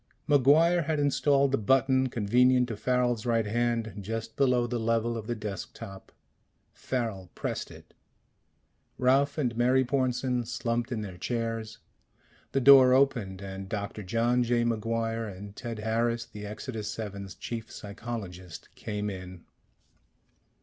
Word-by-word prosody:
MacGuire 155 Hz, +4 st, +5 dB
had 155 Hz, -1 st, 0 dB
installed 140 Hz, -1 st, +3 dB
the 135 Hz, -, +1 dB
button 130 Hz, +3 st, +3 dB
convenient 125 Hz, +3 st, +3 dB
to 110 Hz, -, -3 dB
Farrel's 120 Hz, 0 st, 0 dB
right 115 Hz, -2 st, +1 dB
hand, 115 Hz, 0 st, 0 dB
just 115 Hz, +2 st, -5 dB
below 125 Hz, -3 st, +3 dB
the 120 Hz, 0 st, -2 dB
level 115 Hz, +1 st, 0 dB
of 110 Hz, -2 st, -6 dB
the 120 Hz, -, -1 dB
desk 105 Hz, -3 st, -6 dB
top. 95 Hz, -4 st, -10 dB, 0.6 s
Farrel 110 Hz, -8 st, -3 dB
pressed -, -, -3 dB
it. -, -, -15 dB, 1.0 s
Ralph 135 Hz, +3 st, +3 dB
and 125 Hz, -6 st, 0 dB
Mary 130 Hz, +2 st, +3 dB
Pornsen 125 Hz, -2 st, 0 dB
slumped 115 Hz, +2 st, -2 dB
in 115 Hz, -3 st, -2 dB
their 95 Hz, -4 st, -7 dB
chairs. 115 Hz, 0 st, -3 dB, 0.7 s
The 135 Hz, -, +1 dB
door 130 Hz, -1 st, +8 dB
opened, 115 Hz, -9 st, +1 dB
and 95 Hz, 0 st, -7 dB
Doctor 105 Hz, 0 st, -4 dB
John 115 Hz, +5 st, +1 dB
J. 120 Hz, 0 st, +2 dB
MacGuire 115 Hz, 0 st, -1 dB
and 100 Hz, +1 st, -10 dB
Ted 115 Hz, +1 st, -5 dB
Harris, 115 Hz, +2 st, 0 dB
the 105 Hz, 0 st, -8 dB
Exodus 105 Hz, 0 st, -5 dB
VII's 100 Hz, -3 st, -6 dB
chief 115 Hz, -2 st, -6 dB
psychologist, 100 Hz, -5 st, -7 dB
came 105 Hz, -1 st, -4 dB
in. 95 Hz, -3 st, -7 dB
115 Hz, 135 wpm, -28 LUFS, 105-125 Hz, 1.0 s, door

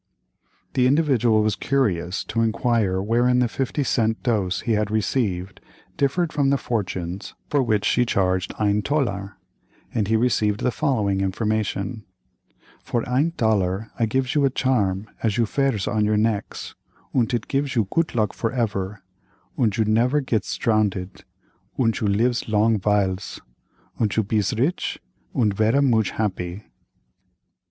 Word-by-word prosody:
The 125 Hz, -1 st, +3 dB
Individual 125 Hz, -7 st, +3 dB
was 105 Hz, -1 st, +1 dB
curious 95 Hz, -10 st, 0 dB
to 115 Hz, -, -2 dB
inquire 110 Hz, -4 st, +1 dB
wherein 120 Hz, +4 st, +2 dB
the 125 Hz, -1 st, +3 dB
fifty 135 Hz, +4 st, -2 dB
cent 110 Hz, -3 st, 0 dB
dose 100 Hz, -7 st, 0 dB
he 120 Hz, -, -2 dB
had 105 Hz, -1 st, +1 dB
received, 105 Hz, -4 st, -1 dB, 0.3 s
differed 160 Hz, +4 st, 0 dB
from 140 Hz, -3 st, +2 dB
the 140 Hz, -, +3 dB
fortunes 95 Hz, -6 st, -4 dB, 0.2 s
for 145 Hz, -, +3 dB
which 110 Hz, -4 st, +1 dB
she 125 Hz, -, +3 dB
charged 95 Hz, -5 st, 0 dB
"ein 105 Hz, 0 st, +2 dB
tollar," 105 Hz, -7 st, -2 dB, 0.6 s
and 105 Hz, -3 st, 0 dB
he 110 Hz, -, +2 dB
received 110 Hz, -3 st, +1 dB
the 125 Hz, -, +1 dB
following 105 Hz, -8 st, 0 dB
information: 105 Hz, +2 st, -2 dB, 0.8 s
"For 120 Hz, -2 st, -2 dB
ein 140 Hz, +7 st, +1 dB
tollar 110 Hz, -3 st, 0 dB
I 115 Hz, -, +2 dB
gifs 130 Hz, +2 st, 0 dB
you 145 Hz, -, +2 dB
a 135 Hz, -, +4 dB
charm 110 Hz, -7 st, 0 dB
as 110 Hz, -1 st, 0 dB
you 115 Hz, -, +3 dB
vears 130 Hz, -4 st, 0 dB
on 110 Hz, -1 st, +1 dB
your 105 Hz, 0 st, +2 dB
necks, 105 Hz, -1 st, -2 dB, 0.4 s
und 125 Hz, -1 st, +2 dB
it 120 Hz, -3 st, -2 dB
gifs 140 Hz, 0 st, -1 dB
you 110 Hz, -5 st, +2 dB
goot 165 Hz, -5 st, 0 dB
luck 110 Hz, -3 st, +1 dB
for 115 Hz, -, -2 dB
ever, 105 Hz, -5 st, -2 dB, 0.5 s
und 110 Hz, -6 st, +1 dB
you 110 Hz, -, +2 dB
never 120 Hz, +7 st, +2 dB
gets 110 Hz, -9 st, -1 dB
drownded, 100 Hz, -4 st, 0 dB, 0.5 s
und 115 Hz, -3 st, +1 dB
you 105 Hz, -, 0 dB
lifs 115 Hz, +5 st, +1 dB
long 110 Hz, +1 st, +3 dB
viles, 100 Hz, -1 st, 0 dB, 0.6 s
und 105 Hz, -3 st, +1 dB
you 110 Hz, -, +2 dB
bees 105 Hz, +1 st, 0 dB
rich 140 Hz, +10 st, 0 dB, 0.4 s
und 105 Hz, -4 st, +2 dB
vera 110 Hz, +6 st, +3 dB
mooch 115 Hz, -7 st, +3 dB
happy." 95 Hz, -2 st, -3 dB
110 Hz, 150 wpm, -23 LUFS, 100-125 Hz, 0.8 s, a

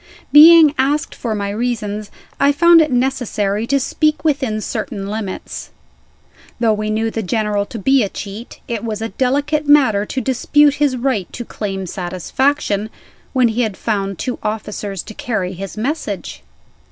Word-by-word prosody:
Being 315 Hz, 0 st, +8 dB
asked 285 Hz, +3 st, +1 dB
for 225 Hz, -3 st, -3 dB
my 200 Hz, -1 st, -3 dB
reasons, 215 Hz, -2 st, -3 dB, 0.3 s
I 280 Hz, +1 st, +4 dB
found 340 Hz, +3 st, +6 dB
it 305 Hz, -, +1 dB
necessary 235 Hz, -5 st, 0 dB
to 275 Hz, +2 st, +2 dB
speak 305 Hz, +4 st, 0 dB
within 270 Hz, -8 st, 0 dB
certain 205 Hz, -2 st, -4 dB
limits. 205 Hz, -2 st, -5 dB, 0.9 s
Though 230 Hz, -2 st, +3 dB
we 215 Hz, 0 st, -2 dB
knew 220 Hz, +1 st, 0 dB
the 225 Hz, -, -3 dB
General 210 Hz, 0 st, -1 dB
to 240 Hz, -, -7 dB
be 270 Hz, +5 st, +3 dB
a 205 Hz, -, 0 dB
cheat, 205 Hz, +5 st, -8 dB
it 230 Hz, -2 st, -3 dB
was 220 Hz, -1 st, -3 dB
a 225 Hz, -, -3 dB
delicate 285 Hz, +4 st, 0 dB
matter 255 Hz, -9 st, +4 dB
to 265 Hz, -, -3 dB
dispute 275 Hz, +4 st, +3 dB
his 275 Hz, -3 st, +2 dB
right 240 Hz, -7 st, -1 dB
to 240 Hz, -, -6 dB
claim 195 Hz, -4 st, -4 dB
satisfaction, 200 Hz, -, -1 dB, 0.4 s
when 255 Hz, -3 st, +3 dB
he 225 Hz, +2 st, -1 dB
had 215 Hz, -5 st, -2 dB
found 195 Hz, -4 st, -2 dB
two 250 Hz, -, -4 dB
officers 210 Hz, -3 st, -4 dB
to 215 Hz, -, -10 dB
carry 195 Hz, -6 st, -3 dB
his 195 Hz, +3 st, -7 dB
message. 215 Hz, -, -4 dB
225 Hz, 160 wpm, -18 LUFS, 205-270 Hz, 0.9 s, Being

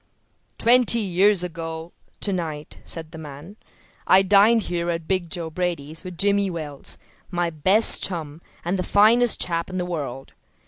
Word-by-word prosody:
"Twenty 240 Hz, 0 st, +4 dB
years 195 Hz, -2 st, +2 dB
ago 165 Hz, -1 st, -6 dB, 0.3 s
to 200 Hz, -, 0 dB
night," 155 Hz, -4 st, -5 dB
said 160 Hz, -1 st, -5 dB
the 160 Hz, -, -9 dB
man, 150 Hz, +5 st, -10 dB, 0.5 s
"I 190 Hz, +1 st, +6 dB
dined 205 Hz, +4 st, +5 dB
here 175 Hz, -1 st, -3 dB
at 165 Hz, -1 st, -3 dB
'Big 185 Hz, -3 st, -1 dB
Joe' 165 Hz, -2 st, -4 dB
Brady's 165 Hz, -2 st, -3 dB
with 180 Hz, -2 st, -8 dB
Jimmy 200 Hz, 0 st, +2 dB
Wells, 155 Hz, -5 st, -3 dB, 0.3 s
my 175 Hz, -2 st, -1 dB
best 190 Hz, +8 st, +3 dB
chum, 160 Hz, -4 st, -4 dB, 0.2 s
and 180 Hz, +2 st, -1 dB
the -, -, +1 dB
finest 220 Hz, +5 st, +4 dB
chap 170 Hz, 0 st, -1 dB
in 185 Hz, -, -5 dB
the 180 Hz, -, -2 dB
world. 140 Hz, -7 st, -6 dB
175 Hz, 155 wpm, -23 LUFS, 160-195 Hz, 0.5 s, I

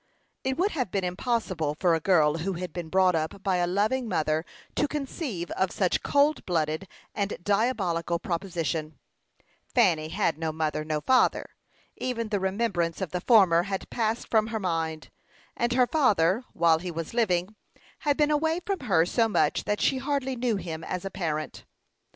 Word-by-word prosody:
It 265 Hz, 0 st, -1 dB
would 385 Hz, +5 st, +2 dB
have 255 Hz, -, -2 dB
been 195 Hz, +1 st, -1 dB
impossible 180 Hz, -, -1 dB
for 175 Hz, -3 st, +3 dB
a 165 Hz, -, +2 dB
girl 160 Hz, -3 st, +3 dB
who 190 Hz, +4 st, -2 dB
had 180 Hz, -2 st, -5 dB
been 175 Hz, -3 st, -5 dB
brought 185 Hz, +1 st, +4 dB
up 160 Hz, +4 st, -2 dB
by 190 Hz, -2 st, +1 dB
a 175 Hz, 0 st, +1 dB
loving 220 Hz, +7 st, 0 dB
mother 155 Hz, -2 st, 0 dB, 0.3 s
to -, -, +2 dB
conceive 275 Hz, -, -4 dB
of 190 Hz, -1 st, 0 dB
such 185 Hz, -3 st, +1 dB
a -, -, -20 dB
cold 290 Hz, +2 st, +2 dB
blooded 160 Hz, 0 st, -1 dB, 0.3 s
and 200 Hz, 0 st, -2 dB
diabolical 195 Hz, -6 st, 0 dB
proposition. 165 Hz, -4 st, -3 dB, 0.8 s
Fanny 155 Hz, -1 st, +3 dB
had 170 Hz, -3 st, 0 dB
no 160 Hz, -1 st, -1 dB
mother, 155 Hz, -1 st, -2 dB
no 155 Hz, -1 st, -2 dB
father. 260 Hz, +7 st, +2 dB, 0.5 s
Even 230 Hz, -3 st, -3 dB
the 205 Hz, -2 st, 0 dB
remembrance 190 Hz, -4 st, -1 dB
of 190 Hz, -5 st, -3 dB
the 180 Hz, -, -2 dB
former 190 Hz, -7 st, +5 dB
had 195 Hz, -1 st, -4 dB
passed 225 Hz, 0 st, -1 dB
from 220 Hz, -1 st, +3 dB
her 225 Hz, -1 st, -3 dB
mind; 165 Hz, -4 st, -2 dB, 0.4 s
and 240 Hz, +1 st, 0 dB
her 250 Hz, 0 st, +4 dB
father, 230 Hz, -, +2 dB
while 165 Hz, -1 st, +3 dB
he 180 Hz, +2 st, -5 dB
was 165 Hz, +1 st, -5 dB
living, 200 Hz, -4 st, +1 dB, 0.4 s
had 290 Hz, -1 st, +1 dB
been 300 Hz, -1 st, +3 dB
away 320 Hz, +3 st, +1 dB
from 395 Hz, -2 st, -1 dB
her 190 Hz, -10 st, +2 dB
so 225 Hz, +5 st, +2 dB
much -, -, +1 dB
that 210 Hz, -, 0 dB
she 265 Hz, -, +2 dB
hardly 265 Hz, -1 st, -1 dB
knew 240 Hz, -2 st, 0 dB
him 165 Hz, -4 st, -5 dB
as 180 Hz, +2 st, -4 dB
a 195 Hz, -, -4 dB
parent. 155 Hz, -5 st, -3 dB
190 Hz, 180 wpm, -27 LUFS, 165-235 Hz, 0.8 s, former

